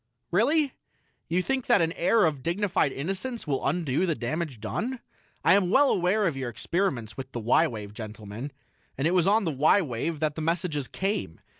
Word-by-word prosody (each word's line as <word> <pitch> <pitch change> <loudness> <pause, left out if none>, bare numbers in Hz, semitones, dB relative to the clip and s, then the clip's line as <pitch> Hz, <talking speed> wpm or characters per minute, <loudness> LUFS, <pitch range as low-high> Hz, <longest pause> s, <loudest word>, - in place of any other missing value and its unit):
"Really? 275 - +2 0.5
You 180 +2 +1
think 270 +1 -1
that - - +5
an 165 -1 +2
air 210 +6 +3
of 150 -4 -1
dignified 175 -1 +1
innocence 195 - -4
will 140 -4 -1
undo 155 +2 0
the 165 - +1
damage 140 +1 -3
done? 230 - -3 0.4
I - - +6
am 195 -3 +3
well 275 +7 +5
aware 190 +4 +2
of 165 -6 0
your 130 -2 -3
experiments 120 - -2
with 135 0 -7
the 120 - -3
y 115 +1 +3
wave, 105 -3 -7
gentlemen 110 +3 -7 0.5
and 135 - -1
it 175 - +1
was 180 -1 +3
on 215 +2 +4
the 165 - 0
y 150 +8 +4
wave 155 - -2
that 155 -1 0
the 160 - -5
messages 160 -4 -1
came. 190 - -3
165 Hz, 190 wpm, -27 LUFS, 130-195 Hz, 0.5 s, I